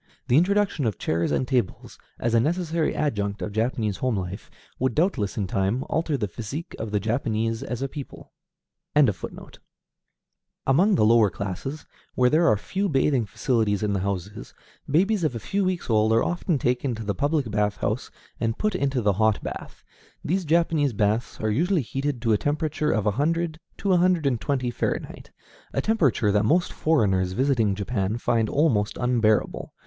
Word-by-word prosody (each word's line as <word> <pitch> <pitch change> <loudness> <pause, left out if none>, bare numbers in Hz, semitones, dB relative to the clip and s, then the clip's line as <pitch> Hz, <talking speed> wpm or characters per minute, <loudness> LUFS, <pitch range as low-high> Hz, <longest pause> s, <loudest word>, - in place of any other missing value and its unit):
The 120 - +4
introduction 185 - +2
of 105 - -2
chairs 85 +1 -1
and 130 - 0
tables, 125 -7 -2 0.2
as 115 0 -1
a 115 - +5
necessary 165 +3 0
adjunct 105 -9 -1
of 105 - -4
Japanese 110 -1 -1
home 125 -4 0
life, 95 +2 -5 0.3
would 130 -2 0
doubtless 150 - 0
in 105 - 0
time 100 +7 0
alter 160 -2 0
the 105 -5 -1
physique 115 - -6
of 110 - -4
the 105 0 0
Japanese 115 0 -1
as 125 +1 -4
a - - 0
people. 140 0 -9 0.6
Among 135 - -2
the 110 - +3
lower 110 -2 +5
classes, 100 - -5 0.3
where 125 0 +3
there 165 +2 +4
are 110 - +4
few 195 - -2
bathing 135 -5 +2
facilities 110 -2 0
in 105 -1 0
the 100 - 0
houses, 100 +2 -4 0.3
babies 190 +6 +2
of 150 -6 0
a - - -3
few 195 - -1
weeks 185 -2 -1
old 110 -1 +3
are 115 - +3
often 175 -2 0
taken 125 0 0
to 110 - -6
the 100 -1 -1
public 145 -3 0
bath 105 -1 0
house 115 +6 -2 0.3
and 115 -1 -1
put 215 -1 0
into 135 -8 0
the 105 -1 +3
hot 110 +2 +1
bath. - - -7 0.4
These 185 +3 0
Japanese 160 -4 +2
baths 105 +3 0
are 110 -1 0
usually 170 - +1
heated 135 0 -3
to 115 -2 +3
a 105 - +2
temperature 150 +1 -1
of 110 -2 0
a 105 - +3
hundred 160 +6 -1 0.2
to 195 -2 +1
a - - +5
hundred 175 -3 +2
and 125 -5 +1
twenty 130 -4 -1
Fahrenheit, 120 - -4 0.4
a - - 0
temperature 145 - +2
that 105 +1 +2
most 170 +11 +2
foreigners 95 - +1
visiting 120 -4 +1
Japan 100 0 -2
find 115 -2 +1
almost 120 -9 +1
unbearable. 115 -4 +1
125 Hz, 175 wpm, -25 LUFS, 105-155 Hz, 0.6 s, a